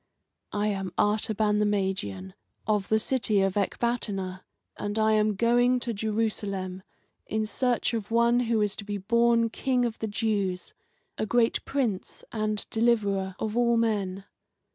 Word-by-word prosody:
"I 210 Hz, +1 st, +1 dB
am 195 Hz, -2 st, -3 dB
Artaban 210 Hz, 0 st, +2 dB
the 210 Hz, -, +3 dB
Magian, 190 Hz, -, -2 dB, 0.3 s
of 210 Hz, -2 st, 0 dB
the 220 Hz, -, +4 dB
city 220 Hz, -3 st, +1 dB
of 195 Hz, -1 st, +1 dB
Ecbatana, 200 Hz, -3 st, -1 dB, 0.3 s
and 205 Hz, +1 st, -4 dB
I 220 Hz, 0 st, +3 dB
am 215 Hz, -1 st, +2 dB
going 245 Hz, +3 st, +3 dB
to 240 Hz, -2 st, -1 dB
Jerusalem 205 Hz, -3 st, -2 dB, 0.5 s
in 220 Hz, 0 st, -1 dB
search 245 Hz, +3 st, 0 dB
of 220 Hz, -3 st, -3 dB
one 235 Hz, +1 st, +3 dB
who 230 Hz, -3 st, +1 dB
is 205 Hz, -1 st, 0 dB
to -, -, -6 dB
be 205 Hz, 0 st, -4 dB
born 230 Hz, +3 st, +2 dB
King 250 Hz, -1 st, +1 dB
of 235 Hz, -1 st, -4 dB
the 220 Hz, -, -2 dB
Jews, 205 Hz, -4 st, -1 dB, 0.5 s
a 215 Hz, -, -1 dB
great 235 Hz, +1 st, +2 dB
Prince 240 Hz, -9 st, -2 dB
and 215 Hz, -1 st, -2 dB
Deliverer 205 Hz, -5 st, +1 dB
of 220 Hz, 0 st, -3 dB
all 235 Hz, -1 st, +3 dB
men. 200 Hz, -4 st, 0 dB
215 Hz, 150 wpm, -27 LUFS, 200-230 Hz, 0.5 s, the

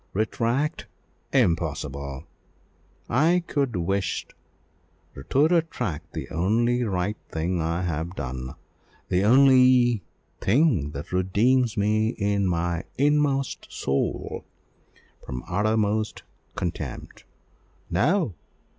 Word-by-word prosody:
Retract! 120 Hz, -, -1 dB, 0.4 s
impossible 75 Hz, -, 0 dB, 0.8 s
I 165 Hz, +8 st, +3 dB
could 140 Hz, -8 st, -1 dB
wish 95 Hz, 0 st, -1 dB
to -, -, -22 dB, 1.1 s
retract 125 Hz, -, -1 dB
the -, -, -5 dB
only 120 Hz, +8 st, +1 dB
right 100 Hz, -1 st, -1 dB
thing 85 Hz, +2 st, -1 dB
I 85 Hz, +3 st, -1 dB
have 85 Hz, +1 st, -3 dB
done, 65 Hz, -1 st, -5 dB, 0.5 s
the 90 Hz, +1 st, +2 dB
only 125 Hz, -1 st, +5 dB, 0.4 s
thing 115 Hz, -, +2 dB
that 70 Hz, -, -7 dB
redeems 110 Hz, +6 st, +2 dB
me 110 Hz, +3 st, +1 dB
in 100 Hz, -1 st, +1 dB
my 85 Hz, 0 st, -1 dB
inmost 145 Hz, -1 st, +1 dB
soul 70 Hz, 0 st, -2 dB, 0.8 s
from 65 Hz, -1 st, -6 dB
uttermost 105 Hz, +2 st, 0 dB, 0.3 s
contempt. 85 Hz, -, -5 dB, 0.7 s
No! 145 Hz, -, +2 dB
105 Hz, 90 wpm, -25 LUFS, 85-125 Hz, 1.1 s, only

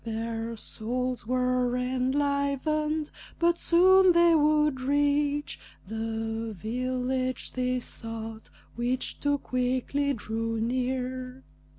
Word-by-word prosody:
Their 225 Hz, 0 st, -4 dB
souls 250 Hz, +3 st, -3 dB
were 250 Hz, 0 st, +1 dB
enlivened, 280 Hz, +4 st, 0 dB, 0.3 s
but 340 Hz, 0 st, +2 dB
soon 370 Hz, +2 st, +6 dB
they 340 Hz, 0 st, +6 dB
would 300 Hz, -3 st, +3 dB
reach 290 Hz, +1 st, +1 dB, 0.3 s
The 225 Hz, 0 st, -3 dB
village 255 Hz, +4 st, -2 dB
they 255 Hz, 0 st, 0 dB
sought, 225 Hz, -1 st, -7 dB, 0.3 s
which 245 Hz, +2 st, -2 dB
too 285 Hz, 0 st, +1 dB
quickly 260 Hz, +2 st, 0 dB
drew 225 Hz, 0 st, -3 dB
near. 255 Hz, +2 st, -2 dB
255 Hz, 90 wpm, -28 LUFS, 230-285 Hz, 0.3 s, soon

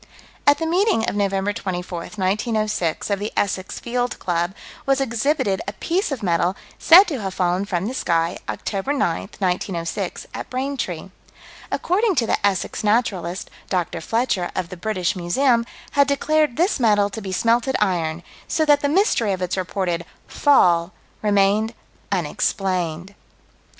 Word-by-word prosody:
At 285 Hz, -, +7 dB
the 325 Hz, -, -2 dB
meeting 345 Hz, -, +2 dB
of -, -, -1 dB
Nov. 200 Hz, -1 st, +2 dB, 0.2 s
24, 180 Hz, -2 st, -4 dB
1906, 215 Hz, -1 st, -1 dB
of 200 Hz, -, +1 dB
the 210 Hz, +1 st, -3 dB
Essex 190 Hz, -1 st, -1 dB
Field 245 Hz, 0 st, -2 dB
Club, 175 Hz, +1 st, -1 dB, 0.3 s
was 275 Hz, 0 st, +3 dB
exhibited 235 Hz, -4 st, 0 dB
a 200 Hz, -, -3 dB
piece 345 Hz, -, -1 dB
of 255 Hz, -6 st, -4 dB
metal 175 Hz, 0 st, +1 dB, 0.2 s
said 350 Hz, +4 st, +9 dB
to 295 Hz, -, -4 dB
have 190 Hz, -1 st, -4 dB
fallen 180 Hz, +1 st, +1 dB
from 185 Hz, -2 st, -2 dB
the 240 Hz, -, -3 dB
sky, 170 Hz, -7 st, 0 dB
Oct. -, -, -4 dB
9, 285 Hz, +1 st, +1 dB
1906, 180 Hz, -1 st, -2 dB
at -, -, -6 dB
Braintree. 255 Hz, -, -3 dB, 0.6 s
According 400 Hz, +2 st, +1 dB
to 240 Hz, -5 st, +2 dB
the -, -, 0 dB
Essex 200 Hz, 0 st, 0 dB
Naturalist, 195 Hz, -5 st, 0 dB, 0.2 s
Dr. 175 Hz, -2 st, -1 dB
Fletcher, 215 Hz, -2 st, 0 dB
of 180 Hz, -2 st, -2 dB
the -, -, -7 dB
British 185 Hz, -1 st, -1 dB
Museum, 235 Hz, +7 st, +2 dB, 0.2 s
had 280 Hz, -1 st, +4 dB
declared 295 Hz, -1 st, +1 dB
this 345 Hz, -1 st, +2 dB
metal 205 Hz, -4 st, +3 dB
to 220 Hz, -, -6 dB
be 195 Hz, -2 st, -5 dB
smelted 235 Hz, +6 st, +2 dB
iron 170 Hz, -4 st, 0 dB, 0.2 s
"so 315 Hz, -, +1 dB
that 290 Hz, -1 st, +4 dB
the 285 Hz, -, +1 dB
mystery 290 Hz, -, +2 dB
of 185 Hz, -, -4 dB
its 180 Hz, -, -1 dB
reported 185 Hz, -2 st, -2 dB, 0.2 s
'fall' 175 Hz, -10 st, +3 dB, 0.3 s
remained 210 Hz, +2 st, +2 dB, 0.4 s
unexplained." 180 Hz, 0 st, -1 dB
205 Hz, 150 wpm, -22 LUFS, 180-255 Hz, 0.6 s, said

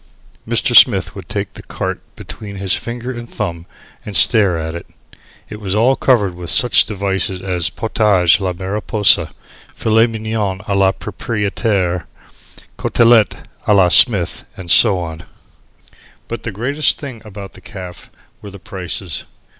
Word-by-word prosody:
Mr. -, -, +1 dB
Smith -, -, +5 dB
would -, -, -11 dB
take -, -, -4 dB
the -, -, -11 dB
carte -, -, -5 dB, 0.2 s
between 105 Hz, -2 st, -10 dB
his 95 Hz, -1 st, -2 dB
finger 120 Hz, +2 st, -4 dB
and 120 Hz, -1 st, -8 dB
thumb 85 Hz, -5 st, -5 dB, 0.4 s
and 105 Hz, -, -7 dB
stare 95 Hz, +3 st, +4 dB
at 80 Hz, 0 st, -5 dB
it. 85 Hz, -, -8 dB, 0.6 s
It 105 Hz, -, -10 dB
was 95 Hz, -1 st, -3 dB
all 120 Hz, +5 st, +3 dB
covered 105 Hz, -10 st, +1 dB
with 85 Hz, -1 st, -3 dB
such 125 Hz, -, +5 dB
devices 95 Hz, -2 st, -2 dB
as 90 Hz, -3 st, -2 dB
Potage 100 Hz, -6 st, +2 dB
la 95 Hz, -2 st, -2 dB
Mariposa 100 Hz, +3 st, +1 dB, 0.4 s
Filet 115 Hz, +1 st, +2 dB
Mignon 110 Hz, -3 st, -4 dB
a 100 Hz, -, -1 dB
la 95 Hz, -1 st, +3 dB
proprietaire 100 Hz, -4 st, -2 dB, 0.7 s
Cotellete 115 Hz, -2 st, +3 dB, 0.2 s
a 105 Hz, -, +4 dB
la 95 Hz, -3 st, +4 dB
Smith, 95 Hz, -2 st, +4 dB
and 85 Hz, -3 st, -5 dB
so 105 Hz, -5 st, +6 dB
on. 80 Hz, -2 st, -6 dB, 1.1 s
But 115 Hz, -, -6 dB
the 115 Hz, -, -5 dB
greatest 130 Hz, +9 st, 0 dB
thing 130 Hz, -6 st, -9 dB
about 100 Hz, -2 st, -10 dB
the -, -, -14 dB
caff 90 Hz, -2 st, -10 dB, 0.3 s
were 105 Hz, -, -10 dB
the 100 Hz, -, -11 dB
prices. 90 Hz, -3 st, -6 dB
100 Hz, 145 wpm, -16 LUFS, 90-110 Hz, 1.1 s, so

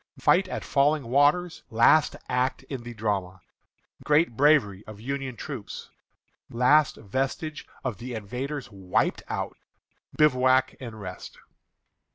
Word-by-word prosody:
Fight 185 Hz, +1 st, +3 dB
at -, -, -5 dB
Falling 145 Hz, +1 st, +2 dB
Waters, 145 Hz, +8 st, +2 dB
Last 120 Hz, +7 st, +4 dB
Act 125 Hz, +1 st, -1 dB
in 135 Hz, -4 st, -6 dB
the 120 Hz, 0 st, -9 dB
Drama. 100 Hz, -4 st, -2 dB, 0.6 s
Great 150 Hz, -4 st, +2 dB
Bravery 125 Hz, -8 st, +3 dB
of 105 Hz, -1 st, -10 dB
Union 135 Hz, +1 st, -4 dB
Troops. 125 Hz, -3 st, -7 dB, 0.6 s
Last 140 Hz, +5 st, +3 dB
Vestige 135 Hz, +7 st, -4 dB, 0.2 s
of 125 Hz, -6 st, -3 dB
the 125 Hz, 0 st, -6 dB
Invaders 125 Hz, +5 st, -5 dB
Wiped 95 Hz, -2 st, -1 dB
Out. -, -, -3 dB, 0.6 s
Bivouac 130 Hz, -3 st, +3 dB
and 115 Hz, -4 st, -8 dB
Rest. 95 Hz, -2 st, -8 dB
130 Hz, 120 wpm, -26 LUFS, 110-145 Hz, 0.6 s, Last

